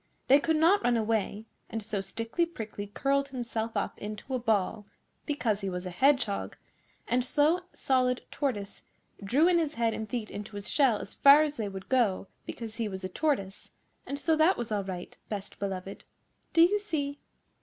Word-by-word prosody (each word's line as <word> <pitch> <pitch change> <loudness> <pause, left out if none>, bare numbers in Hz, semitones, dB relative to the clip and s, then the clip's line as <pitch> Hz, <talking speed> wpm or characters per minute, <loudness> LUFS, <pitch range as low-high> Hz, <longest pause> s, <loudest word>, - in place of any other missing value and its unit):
They 275 +2 +8
could 320 +2 +1
not 340 +7 +4
run 240 -1 +3
away, 220 -1 -1 0.2
and 225 -1 -4
so 205 -2 -2
Stickly 230 - -2
Prickly 215 -9 -6
curled 275 +6 0
himself 230 -4 -3
up 200 - -2
into 215 +5 -6
a 255 - +1
ball, 215 -2 0 0.4
because 235 -9 0
he 195 - -2
was 180 0 -4
a 180 - -4
Hedgehog, 250 0 +1 0.5
and 250 0 +2
Slow 300 +7 +3
Solid 255 -1 +1
Tortoise 210 -9 -3 0.4
drew 275 - +4
in 355 -1 +4
his 310 -2 -1
head 230 -1 +1
and 220 -1 -5
feet 225 -2 -3
into 205 +1 -7
his 200 -1 -5
shell 265 -7 +4
as 205 - -8
far 280 +2 +7
as 300 -1 -3
they 210 -3 -2
would 190 -1 -8
go, 230 -8 +2 0.2
because 225 -1 -6
he 225 -3 -1
was 190 -1 -6
a 185 - -3
Tortoise; 195 -6 -1 0.4
and 280 - -3
so 320 +2 +2
that 320 +5 +4
was 235 -2 -4
all 205 -2 0
right, 185 -2 -6
Best 205 -2 -6
Beloved. 195 -1 -5 0.5
Do 330 - +6
you 405 +5 +4
see? 290 -8 -2
230 Hz, 185 wpm, -29 LUFS, 205-285 Hz, 0.5 s, They